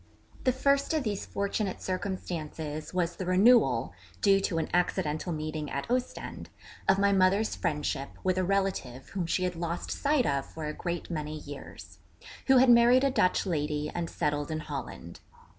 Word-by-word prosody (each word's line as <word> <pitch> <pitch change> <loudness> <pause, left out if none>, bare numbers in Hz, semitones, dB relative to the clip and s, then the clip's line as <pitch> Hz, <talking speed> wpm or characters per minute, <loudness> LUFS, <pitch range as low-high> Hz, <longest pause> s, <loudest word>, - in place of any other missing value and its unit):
The 255 - +5
first 280 +4 +2
of 305 - +1
these 205 -4 -3
fortunate 200 -1 -2
circumstances 160 -5 -4
was 175 -1 -1
the 185 - -4
renewal 185 - +4 0.3
(due 195 -1 +4
to 175 -3 -1
an 160 - 0
accidental 175 -2 0
meeting 155 -1 -3
at 140 - -3
Ostend) 250 0 -3 0.4
of 190 - +6
my 200 0 +3
mother's 195 +3 +3
friendship 145 -2 -2
with 185 0 +1
a - - +2
relative 185 -10 -1
whom 185 -4 -3
she 185 +2 0
had 180 -1 -1
lost 170 +1 -3
sight 285 -3 +1
of 140 -1 0
for 160 -1 -7
a 150 - -3
great 175 +2 -4
many 155 -1 -3
years; 145 -2 -10 0.5
who 265 -1 +6
had 250 0 +7
married 240 +2 +6
a 275 - +3
Dutch 185 -8 +2
lady 150 -3 -1
and 170 -1 -3
settled 145 -2 -1
in 155 0 -2
Holland. 130 - -7
175 Hz, 170 wpm, -29 LUFS, 150-200 Hz, 0.5 s, had